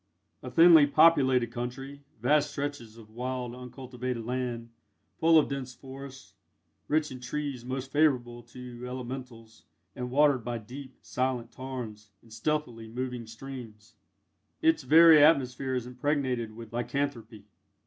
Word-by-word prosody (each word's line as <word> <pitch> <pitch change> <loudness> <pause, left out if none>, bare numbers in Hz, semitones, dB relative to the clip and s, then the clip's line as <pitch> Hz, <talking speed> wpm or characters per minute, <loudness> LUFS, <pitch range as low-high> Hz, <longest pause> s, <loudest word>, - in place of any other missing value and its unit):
A 130 - -7
thinly 165 0 +7
populated 130 -6 +4
country 135 +4 -6 0.2
vast 145 +5 +3
stretches 140 -6 -5
of 110 -2 -15
wild 125 +1 -4
uncultivated 125 -1 -6
land, 120 -2 -3 0.5
full 165 -1 +5
of 155 - +4
dense 130 -2 -5
forests, 135 -4 -11 0.5
rich 150 -1 +1
in 130 - -7
trees 135 0 -4
most 130 +1 -5
favourable 125 -6 +1
to 120 0 -11
Elementals, 125 -3 -8 0.3
and 125 0 -4
watered 140 -2 +3
by 120 0 -3
deep, 130 +4 -10
silent 125 -2 -2
tarns, 115 -5 -7
and 115 -1 -16
stealthily 120 -2 -2
moving 125 0 -5
streams, 115 -3 -10 0.7
its 325 -1 +3
very 160 -1 +7
atmosphere 135 -4 +3
is 125 -2 -2
impregnated 125 -3 -2
with 115 -1 -11
lycanthropy. 120 -3 -3
125 Hz, 130 wpm, -29 LUFS, 120-140 Hz, 0.7 s, thinly